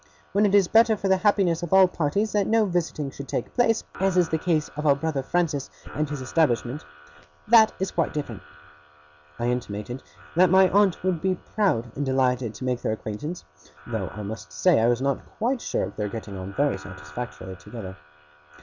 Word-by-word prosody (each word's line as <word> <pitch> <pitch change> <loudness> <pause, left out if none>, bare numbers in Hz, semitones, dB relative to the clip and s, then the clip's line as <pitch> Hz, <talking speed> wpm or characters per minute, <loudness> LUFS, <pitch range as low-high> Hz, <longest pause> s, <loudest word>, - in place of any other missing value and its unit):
When 205 +1 +3
it 200 - +2
is 195 -3 +5
better 225 +1 +5
for 200 - -2
the 190 0 +4
happiness 190 -4 +2
of 175 - -5
all 190 -1 +7
parties 180 +5 -1
that 205 -2 +1
no 225 -1 +3
visiting 165 -6 -2
should 140 +1 -9
take - - -3
place, 225 -3 +2 0.2
(as 190 -1 +1
in 180 - +6
the 160 - +1
case 160 -3 0
of 150 +1 -2
our 140 - +6
brother 145 -1 -2
Francis, 150 -2 -1 0.2
and 150 0 -1
his 145 -2 -4
establishment) 130 -2 0 0.6
that 220 -1 +7
is 190 - -2
quite 165 - 0
different.' 140 -9 -5 1.0
I 120 - -2
intimated 120 0 -3 0.3
that 180 +1 +5
my 190 +1 +6
aunt 200 -3 +3
would 185 -4 0
be 190 0 +1
proud 170 - -1
and 145 - -2
delighted 130 -4 0
to 130 - -6
make 125 -1 -1
their - - -1
acquaintance; 110 +11 -6 0.4
though 110 -5 -3
I 105 - -7
must 100 -7 -7
say 75 +8 +3
I 115 - +3
was 120 +2 +1
not 140 -1 0
quite 245 +3 0
sure - - -1
of 95 - -5
their 105 -1 -2
getting 105 -2 -7
on 95 +1 -7
very 145 0 +1
satisfactorily 95 +5 -8
together. 95 -3 -9
150 Hz, 195 wpm, -25 LUFS, 120-190 Hz, 1.0 s, all